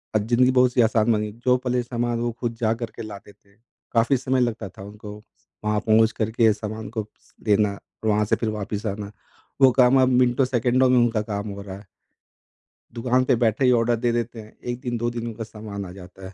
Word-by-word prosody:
अ, - - +7
जिंदगी 120 +4 +3
बहुत 125 -1 +3
सी 125 - +4
आसान 110 0 +3
बनी। 105 -1 0
जो 125 0 +5
पहले 125 -1 -1
सामान 120 -1 -2
वो 120 0 -1
खुद 115 -2 -3
जा 110 0 +2
कर 115 - -4
के - - -7
लाते 105 -1 -10
थे, 100 0 -30 0.4
काफ़ी 120 +4 +3
समय 130 +1 0
लगता 115 -5 -2
था 95 - -12
उनको 105 0 -9 0.5
वहाँ 105 0 +1
पहुँच 110 +1 +3
कर 110 0 -2
के 110 -1 +4
सामान 110 0 -6
को 110 -2 -4 0.4
देना, 105 -1 +2 0.3
वहाँ 105 0 +2
से - - +2
फिर 115 - -2
वापस 105 0 -4
आना, 100 0 -4 0.5
वो 130 -1 +8
काम 130 +1 +5
अब 130 - +4
मिनटों-सेकंडों 125 0 +2
में 125 - +4
उनका 115 -2 +2
काम 105 -1 -4
हो 100 0 -7
रहा 95 -1 -8
है। 100 - -14 1.1
दुकान 125 +2 +1
पे 130 - +3
बैठे 115 +2 +1
ही 125 - +5
ऑर्डर 120 0 +3
दे 120 +1 0
देते 120 -1 -3
हैं, 110 - -16
1 120 0 -4
दिन, 120 -3 -3
2 120 +1 -1
दिन 120 0 -5
उनका 115 0 -5
सामान 105 -2 -7
आ 90 - -9
जाता 95 0 -12
है, 95 - -12
115 Hz, 220 wpm, -23 LUFS, 105-120 Hz, 1.1 s, वो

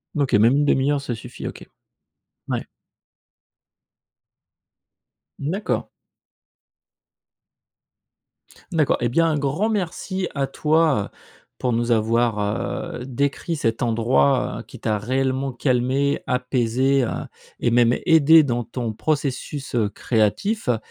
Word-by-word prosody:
OK, 140 -3 0
même 110 +4 +5
une 145 - +2
demi-heure, 140 0 +2
ça 135 -3 -4
suffit, 110 - -8
OK. - - -9 0.8
Ouais. - - -2 2.7
D'accord. 180 +9 -2 2.8
D'accord. 155 -4 +2
Et 120 - +1
bien, 165 +7 +3
un 155 -2 +1
grand 145 +10 0
merci 190 -1 -2
à 135 -1 +1
toi, 150 -5 +2
heu, - - -12 0.5
pour 125 -2 -1
nous 120 +1 0
avoir, 115 0 +2 0.6
heu, - - -5
décrit 140 +5 -2
cet 115 -6 -1
endroit, 110 - +2
heu, - - -8
qui - - -13
t'a 105 -2 -1
réellement 130 +3 -1
calmé, 130 +2 0
apaisé, 125 +1 +1
heu, 120 - -1 0.5
et 120 - +1
même 120 0 +4
aidé 160 -1 +7
dans 120 -3 -1
ton 115 -1 -4
processus, 140 0 -3
heu, 110 -4 +1
créatif, 115 - 0
heu. 120 - +3
130 Hz, 120 wpm, -22 LUFS, 120-145 Hz, 2.8 s, aidé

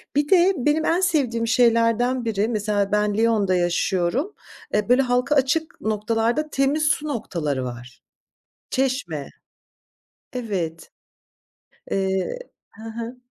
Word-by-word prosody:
bir 290 +1 +1
de 375 +1 +5
benim 295 +5 +1
en 345 +3 +2
sevdiğim 265 -10 +1
şeylerden 230 +1 +2
biri, 215 -2 0
mesela, 210 -3 -1
ben 210 0 +1
Lyon'da 215 -5 +2
yaşıyorum. 180 - 0 0.4
Eee, 210 +2 0
böyle, 250 +2 +5
halka 250 +3 +1
açık 285 +4 0
noktalarda 225 +7 0
temiz 275 +3 +1
su 300 +1 +1
noktaları 155 - -2
var. 125 0 -9 0.7
Çeşme. 255 - -1 1.0
Evet. 190 -10 -4 1.0
Eee 190 - -1 0.3
he 220 - -15
he. 230 +2 -6
230 Hz, 115 wpm, -23 LUFS, 200-270 Hz, 1.0 s, de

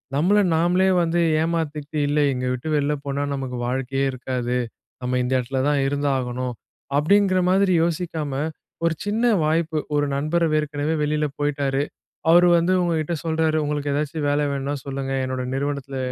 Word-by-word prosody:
நம்மள 185 +8 +3 0.2
நாம்லே 180 +3 +3
வந்து 170 0 +1 0.2
ஏமாத்திக்ட்டு 155 -2 -2
"இல்ல 145 +1 +1
இங்க 125 0 -3
விட்டு 125 +5 -5
வெளில 145 0 +1
போனா 140 0 -2
நமக்கு 130 -2 -4
வாழ்க்கையே 135 +2 -1
இருக்காது, 125 -1 -2 0.4
நம்ம 125 0 0
இந்த 125 - -2
எடத்துல 130 +1 -2
தான் 145 -1 +2
இருந்தாகணும்." 130 -3 -1 0.4
அப்டிங்கிற 185 +4 +3
மாதிரி 190 0 +3
யோசிக்காம 165 -3 -2 0.5
ஒரு 165 - +2
சின்ன 215 +3 0 0.2
வாய்ப்பு, 160 0 0 0.2
ஒரு 145 0 +2
நண்பர் 155 +4 +1
ஏற்கனவே 150 +1 -2
வெளில 150 0 0
போயிட்டாரு, 140 -1 0 0.5
அவரு 175 +1 +7
வந்து 170 +2 +2
உங்ககிட்ட 165 -1 0
சொல்றாரு, 160 -1 +1
"உங்களுக்கு 145 -1 -2
ஏதாச்சும் 150 0 -1
வேல 145 +1 +1
வேணும்னா 140 +1 -2
சொல்லுங்க, 135 -1 -3
என்னோட 130 0 -3
நிறுவனத்துல 140 -1 -3
145 Hz, 145 wpm, -23 LUFS, 135-165 Hz, 0.5 s, அவரு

